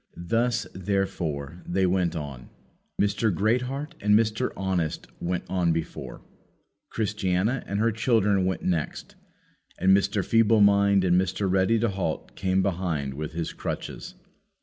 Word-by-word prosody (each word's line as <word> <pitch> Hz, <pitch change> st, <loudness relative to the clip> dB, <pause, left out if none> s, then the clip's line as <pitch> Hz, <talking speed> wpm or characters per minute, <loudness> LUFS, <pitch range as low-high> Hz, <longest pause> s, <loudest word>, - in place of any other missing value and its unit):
Thus, 115 Hz, +6 st, 0 dB
therefore, 90 Hz, -5 st, -2 dB
they 95 Hz, +2 st, +1 dB
went 90 Hz, -2 st, +1 dB
on. 70 Hz, -5 st, -6 dB, 0.5 s
Mr. 105 Hz, +2 st, +2 dB
Greatheart 125 Hz, -, -1 dB
and 105 Hz, 0 st, +5 dB
Mr. 110 Hz, -1 st, 0 dB
Honest 95 Hz, -5 st, -1 dB
went 90 Hz, 0 st, -2 dB
on 90 Hz, -2 st, +1 dB
before, 80 Hz, 0 st, -5 dB, 0.7 s
Christiana 105 Hz, +2 st, 0 dB
and 100 Hz, +1 st, -2 dB
her 115 Hz, +1 st, +3 dB
children 105 Hz, -4 st, +2 dB
went 95 Hz, -, -2 dB
next, 85 Hz, -4 st, -2 dB, 0.6 s
and 95 Hz, +1 st, +5 dB
Mr. 100 Hz, 0 st, +1 dB
Feeble 115 Hz, -1 st, +4 dB
mind 100 Hz, -1 st, +5 dB
and 90 Hz, 0 st, +4 dB
Mr. 95 Hz, +2 st, -1 dB
Ready 95 Hz, +4 st, +3 dB
to 115 Hz, +1 st, +1 dB
halt 95 Hz, -5 st, -3 dB
came 95 Hz, 0 st, +1 dB
behind 85 Hz, -8 st, -1 dB
with 75 Hz, +2 st, -5 dB
his 85 Hz, 0 st, -3 dB
crutches. -, -, -6 dB
95 Hz, 135 wpm, -26 LUFS, 90-105 Hz, 0.7 s, and